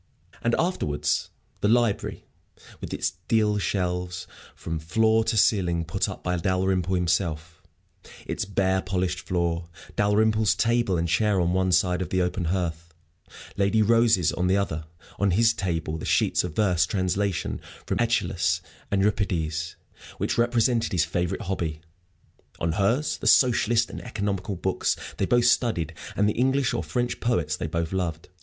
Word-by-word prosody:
And 115 0 +1
afterwards 160 - 0 0.3
the - - +1
library, 115 -1 +1 0.5
with - - -7
its - - -1
deal 105 -2 +2
shelves 90 -2 -2 0.3
from 80 -1 -4
floor 110 +7 +2
to 115 0 0
ceiling 90 -5 +2
put 80 - -1
up - - -8
by 90 0 0
Dalrymple 95 +1 0
himself, 85 -2 -1 0.6
its - - -2
bare, 95 -1 +1
polished 90 -1 -1
floor, 85 -2 -2 0.3
Dalrymple's 110 0 +3
table 115 -5 +1
and 85 +1 0
chair 100 +3 +2
on 90 0 +1
one 95 0 +1
side 90 0 +2
of 90 - -3
the 95 - 0
open 90 0 -1
hearth, 85 -2 -3 0.6
Lady 100 +2 +3
Rose's 115 -6 +4
on 90 - 0
the 95 +2 +3
other; 80 -6 -2 0.3
on 100 - +3
his 115 0 +4
table 80 -5 -2
the - - -6
sheets - - +2
of 75 - -5
verse 90 -6 +2
translation 95 -1 -1 0.2
from - - -2
Æschylus 115 -7 +1 0.3
and 100 -1 +1
Euripides, 85 -5 -1 0.4
which - - -1
represented 120 -1 +1
his 85 -3 +2
favorite 90 +2 -2
hobby; 85 -5 -3 0.8
on 85 0 0
hers 115 - 0
the - - -3
socialist 120 -2 +4
and - - -7
economical 100 -4 -3
books 95 +1 0 0.2
they 95 - 0
both 120 -1 +3
studied 110 - +2 0.2
and 105 - +2
the 105 - +1
English 130 +1 +1
or - - -1
French 120 -1 -2
poets 85 -11 0
they - - -4
both 85 +2 -2
loved. 85 -4 -3
95 Hz, 155 wpm, -25 LUFS, 85-110 Hz, 0.8 s, Rose's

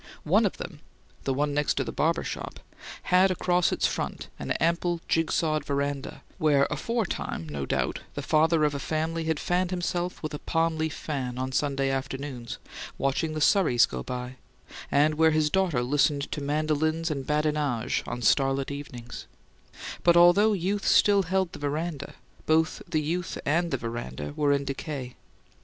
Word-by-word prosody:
One - - +4
of - - -6
them - - -7 0.5
the 135 - +1
one 145 +1 0
next 145 0 +1
to 135 - 0
the 115 - -5
barber 165 +2 +1
shop - - -6 0.5
had 185 +1 +6
across 180 -1 +2
its - - 0
front - - -3
an - - -5
ample, 170 +1 0
jig 165 -1 +1
sawed 155 -2 +1
veranda, 140 -1 -3 0.2
where 145 -3 +4
aforetime, 180 - -2
no 70 -2 -4
doubt, - - -1 0.2
the - - -4
father 160 +1 +3
of 150 -1 +2
a 140 - -3
family 160 +2 -2
had 160 -2 0
fanned 180 0 0
himself 180 -1 -2
with 155 - -4
a 150 - -4
palm 165 0 0
leaf 160 -1 -2
fan 130 -5 -4
on 130 +1 -2
Sunday 135 0 0
afternoons, 135 -2 -4 0.4
watching 155 +3 0
the 155 - -2
surreys 150 - +5
go 65 - -6
by, 125 - -5 0.5
and 150 +2 +4
where 160 0 +6
his 155 -1 +2
daughter 180 -10 +1
listened 145 +2 +1
to 150 - -3
mandolins 155 +2 0
and 135 -3 -4
badinage 150 -5 0
on 120 - -4
starlit 135 +4 +2
evenings; 125 -4 -8 0.8
but, 170 0 +5
although 195 +5 +6
youth 195 +2 -1
still 200 -1 +5
held 190 0 0
the - - -8
veranda, 145 0 -3 0.3
both 160 0 +2
the 155 - +1
youth 170 +4 -2
and 170 +4 +1
the 135 - 0
veranda 75 - -5
were 145 -1 +2
in 140 0 +1
decay. 135 -2 -5
150 Hz, 170 wpm, -27 LUFS, 135-165 Hz, 0.8 s, had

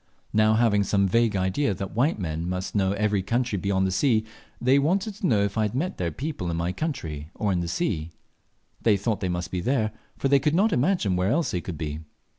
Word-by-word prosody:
Now 110 +1 +4
having 110 -3 +3
some 100 0 +2
vague 115 +2 +2
idea 95 +5 0
that 95 0 -5
white 135 +8 +2
men 85 -2 -3
must 90 +1 -3
know 95 -2 +2
every 105 -1 +1
country 120 +1 -1
beyond 95 0 +1
the 95 - 0
sea, 110 +3 +2 0.3
they 130 +3 +4
wanted 190 +8 +1
to 200 -1 -2
know 105 -4 +3
if 100 +2 -1
I - - +3
had 105 +1 -1
met 170 +8 -2
their 85 -2 -1
people 130 - -4
in 85 - -2
my 85 +2 -1
country 80 - -4
or 105 -2 0
in 90 - +1
the 85 - -2
sea. 85 - -1 0.7
They 105 -3 +4
thought 105 +2 -1
they 95 - -2
must 90 -1 -3
be 90 - -2
there, 110 0 +1 0.3
for - - 0
they 140 0 +5
could 150 +3 +1
not 210 +5 +3
imagine 125 - +2
where 90 +2 +1
else 160 +6 +1
they 90 - -2
could 85 -1 -6
be. 75 -1 -4
100 Hz, 235 wpm, -25 LUFS, 90-130 Hz, 0.7 s, they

